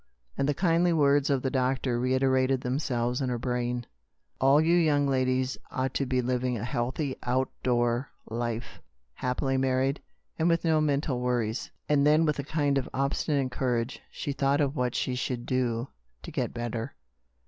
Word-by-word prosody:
And 140 Hz, -, 0 dB
the 145 Hz, -, +1 dB
kindly 175 Hz, 0 st, +3 dB
words 145 Hz, -2 st, +3 dB
of 135 Hz, -2 st, +1 dB
the 130 Hz, -, 0 dB
doctor 130 Hz, -1 st, 0 dB
reiterated 130 Hz, +1 st, +2 dB
themselves 125 Hz, -1 st, -1 dB
in 130 Hz, -, 0 dB
her 125 Hz, -, -1 dB
brain: 125 Hz, 0 st, -2 dB, 0.5 s
"All 135 Hz, +2 st, +5 dB
you 165 Hz, +2 st, +4 dB
young 150 Hz, -4 st, +3 dB
ladies 130 Hz, -1 st, 0 dB
ought 130 Hz, 0 st, -2 dB
to 140 Hz, -, -1 dB
be 125 Hz, -1 st, +1 dB
living 125 Hz, 0 st, 0 dB
a 110 Hz, -, -5 dB
healthy, 130 Hz, +4 st, -2 dB
out 130 Hz, +1 st, 0 dB
door 120 Hz, +1 st, +1 dB, 0.2 s
life, 115 Hz, 0 st, -4 dB, 0.3 s
happily 130 Hz, -, -1 dB
married, 130 Hz, +1 st, +1 dB, 0.4 s
and 165 Hz, +2 st, +3 dB
with 165 Hz, 0 st, +1 dB
no 160 Hz, -1 st, +3 dB
mental 140 Hz, -3 st, 0 dB
worries! 120 Hz, -2 st, -1 dB
" -, -, -50 dB
And 145 Hz, -1 st, +3 dB
then, 155 Hz, +2 st, +5 dB
with 150 Hz, -2 st, 0 dB
a -, -, -1 dB
kind 145 Hz, -1 st, +1 dB
of 130 Hz, -, -5 dB
obsti 140 Hz, +2 st, 0 dB
nate 140 Hz, -4 st, +1 dB
courage, 120 Hz, -1 st, -1 dB
she 145 Hz, -, -4 dB
thought 140 Hz, +1 st, +1 dB
of 140 Hz, -1 st, +1 dB
what 125 Hz, -3 st, -1 dB
she 130 Hz, -, 0 dB
should 125 Hz, -1 st, -3 dB
do 125 Hz, -1 st, -1 dB, 0.3 s
to -, -, -7 dB
get -, -, -2 dB
better. 120 Hz, -1 st, -4 dB
130 Hz, 180 wpm, -28 LUFS, 125-140 Hz, 0.5 s, All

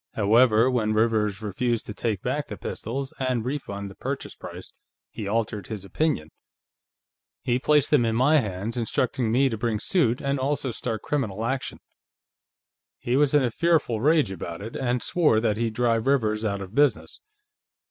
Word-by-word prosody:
However, 110 Hz, +2 st, +4 dB
when 110 Hz, -4 st, +1 dB
Rivers 110 Hz, -2 st, +1 dB
refused 115 Hz, +3 st, -1 dB
to 105 Hz, -, -6 dB
take 105 Hz, -3 st, -2 dB
back -, -, -2 dB
the -, -, -7 dB
pistols 135 Hz, +4 st, -5 dB
and 130 Hz, -3 st, -1 dB
refund 100 Hz, -8 st, -4 dB
the -, -, -13 dB
purchase -, -, -5 dB
price, -, -, -10 dB, 0.4 s
he 105 Hz, -, -6 dB
altered 110 Hz, -2 st, -2 dB
his 105 Hz, -4 st, -6 dB
opinion. 135 Hz, -, -1 dB, 1.1 s
He 125 Hz, 0 st, +1 dB
placed 150 Hz, +1 st, +2 dB
them 145 Hz, -5 st, +5 dB
in 115 Hz, -1 st, 0 dB
my 140 Hz, +6 st, +4 dB
hands, 105 Hz, -1 st, -4 dB
instructing 120 Hz, 0 st, 0 dB
me 135 Hz, +4 st, +4 dB
to 115 Hz, -4 st, -3 dB
bring 115 Hz, -2 st, -1 dB
suit 125 Hz, -, +1 dB
and 140 Hz, 0 st, -1 dB
also 135 Hz, -1 st, -1 dB
start 115 Hz, -2 st, -4 dB
criminal 115 Hz, -7 st, -2 dB
action; 130 Hz, +2 st, -3 dB, 1.2 s
he 120 Hz, -, -1 dB
was 145 Hz, +1 st, +3 dB
in 145 Hz, -, +5 dB
a 120 Hz, -, 0 dB
fearful 155 Hz, -8 st, +1 dB
rage 150 Hz, -5 st, +3 dB
about 85 Hz, -2 st, -6 dB
it, 110 Hz, +4 st, -8 dB
and 125 Hz, -2 st, -1 dB
swore 155 Hz, -11 st, +3 dB
that 110 Hz, -2 st, 0 dB
he'd 115 Hz, -1 st, -1 dB
drive 115 Hz, 0 st, +1 dB
Rivers 110 Hz, -6 st, +1 dB
out 100 Hz, -2 st, -1 dB
of 95 Hz, +1 st, -8 dB
business. 140 Hz, -4 st, +1 dB
115 Hz, 170 wpm, -25 LUFS, 110-130 Hz, 1.2 s, them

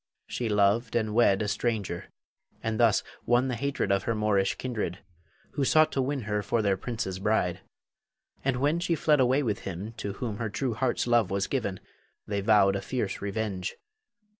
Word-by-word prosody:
She 120 Hz, -2 st, -3 dB
loved 105 Hz, +3 st, +2 dB
and 110 Hz, -2 st, 0 dB
wed 105 Hz, -3 st, +4 dB
a -, -, -2 dB
stranger, 105 Hz, -4 st, -2 dB, 0.6 s
and 110 Hz, -1 st, -1 dB
thus 115 Hz, -3 st, +4 dB, 0.2 s
won 120 Hz, +2 st, +3 dB
the 125 Hz, -, -1 dB
hatred 135 Hz, -5 st, -1 dB
of 100 Hz, -1 st, +1 dB
her 115 Hz, -, 0 dB
Moorish 105 Hz, -3 st, +1 dB
kindred, 115 Hz, -8 st, -3 dB, 0.5 s
who 140 Hz, -, -1 dB
sought 155 Hz, +3 st, +4 dB
to 135 Hz, -, 0 dB
win 135 Hz, +1 st, -1 dB
her 105 Hz, -1 st, -1 dB
for 110 Hz, +2 st, 0 dB
their 100 Hz, -2 st, +3 dB
prince's 95 Hz, -2 st, -4 dB
bride. 95 Hz, -3 st, +1 dB, 0.8 s
And 135 Hz, -1 st, +1 dB
when 150 Hz, +5 st, +2 dB
she 170 Hz, -1 st, 0 dB
fled 150 Hz, -2 st, +3 dB
away 130 Hz, +3 st, +3 dB
with 110 Hz, -5 st, -1 dB
him 95 Hz, +3 st, -6 dB
to 100 Hz, -, -4 dB
whom 105 Hz, 0 st, -4 dB
her 115 Hz, -1 st, -2 dB
true 125 Hz, +3 st, -2 dB
heart's 125 Hz, +2 st, 0 dB
love 120 Hz, -5 st, +3 dB
was 95 Hz, 0 st, 0 dB
given, 100 Hz, -9 st, -2 dB, 0.5 s
they 100 Hz, -1 st, -2 dB
vowed 100 Hz, -2 st, +4 dB
a 100 Hz, -, -2 dB
fierce 105 Hz, -2 st, -3 dB
revenge. 100 Hz, -2 st, -3 dB
110 Hz, 185 wpm, -28 LUFS, 100-125 Hz, 0.8 s, wed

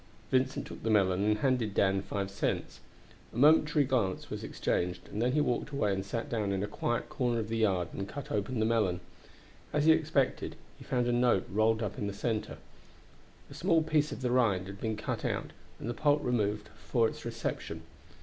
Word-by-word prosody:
Vincent 130 Hz, 0 st, +1 dB
took -, -, -9 dB
the 115 Hz, -, -1 dB
melon 95 Hz, -3 st, +3 dB
and 105 Hz, 0 st, +3 dB
handed 115 Hz, -4 st, +1 dB
Dan 95 Hz, 0 st, +3 dB
five 100 Hz, 0 st, -3 dB
cents. 100 Hz, -, -2 dB, 0.5 s
A -, -, -9 dB
momentary 150 Hz, +1 st, +5 dB
glance 115 Hz, -8 st, -1 dB
was -, -, -4 dB
exchanged, 90 Hz, 0 st, -2 dB
and 105 Hz, -, -3 dB
then 125 Hz, +2 st, +2 dB
he 150 Hz, -, +3 dB
walked 130 Hz, -1 st, 0 dB
away 125 Hz, -9 st, 0 dB
and 95 Hz, 0 st, -2 dB
sat 115 Hz, +6 st, -3 dB
down 110 Hz, -7 st, -1 dB
in 95 Hz, 0 st, -1 dB
a -, -, -1 dB
quiet 120 Hz, +3 st, -2 dB
corner 120 Hz, -2 st, 0 dB
of 110 Hz, -1 st, -4 dB
the 115 Hz, -, -1 dB
yard 95 Hz, -6 st, +1 dB
and 100 Hz, 0 st, -4 dB
cut 140 Hz, -1 st, -7 dB
open 105 Hz, +4 st, -1 dB
the 110 Hz, -, +2 dB
melon. 110 Hz, -6 st, +2 dB, 0.7 s
As 150 Hz, 0 st, +1 dB
he 160 Hz, -, +8 dB
expected, 155 Hz, -4 st, +1 dB, 0.2 s
he -, -, -10 dB
found 125 Hz, -1 st, 0 dB
a 120 Hz, -, +1 dB
note 120 Hz, -5 st, +3 dB
rolled 110 Hz, +2 st, +2 dB
up 105 Hz, -, -4 dB
in 100 Hz, -, -1 dB
the 100 Hz, -, -3 dB
center. 110 Hz, +1 st, -2 dB, 0.9 s
A -, -, -8 dB
small 170 Hz, -3 st, +2 dB
piece 155 Hz, -1 st, +1 dB
of -, -, -6 dB
the 125 Hz, -1 st, 0 dB
rind 110 Hz, -8 st, +3 dB
had 100 Hz, +1 st, -9 dB
been 110 Hz, -1 st, -1 dB
cut -, -, -3 dB
out -, -, -2 dB, 0.3 s
and -, -, -6 dB
the 120 Hz, -, -1 dB
pulp 145 Hz, +4 st, +2 dB
removed 105 Hz, -3 st, 0 dB
for 110 Hz, +8 st, +2 dB
its -, -, -7 dB
reception. 115 Hz, -8 st, -4 dB
115 Hz, 205 wpm, -31 LUFS, 100-130 Hz, 0.9 s, he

